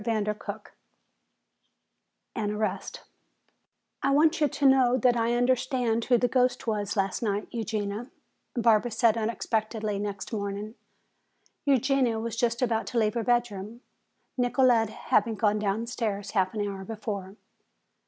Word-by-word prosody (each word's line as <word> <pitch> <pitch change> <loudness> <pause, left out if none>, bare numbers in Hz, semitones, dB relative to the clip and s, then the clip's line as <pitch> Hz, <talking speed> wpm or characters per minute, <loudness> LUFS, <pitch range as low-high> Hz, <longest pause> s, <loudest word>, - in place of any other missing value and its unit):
CHAPTER 210 -2 0
XIII 205 - -2 1.8
An 215 -3 -2
Arrest 215 0 -3 1.0
"I 275 - +1
want 305 +3 +3
you 300 - +5
to 285 +1 -2
know 260 -2 +5
that 245 0 +3
I 235 0 +1
understand 245 -2 +1
who 245 - +4
the 245 - +2
ghost 250 0 +1
was 210 -2 -2
last 195 -1 0
night, 205 -2 -1
Eugenia," 220 +1 -3 0.5
Barbara 230 -1 +3
said 230 0 +3
unexpectedly 220 -2 -2
next 205 +1 -5
morning. 205 +1 -4 0.9
Eugenia 270 -3 +2
was 230 0 -4
just 235 +1 0
about 225 -2 0
to 245 - -3
leave 215 -2 +2
her 235 - -1
bedroom, 235 -2 -1 0.6
Nicolete 245 -3 +3
having 220 0 0
gone 210 -1 +1
downstairs 210 0 -2
half 190 0 0
an 205 -1 -1
hour 195 -1 -5
before. 200 -2 -5
225 Hz, 135 wpm, -27 LUFS, 210-245 Hz, 1.8 s, you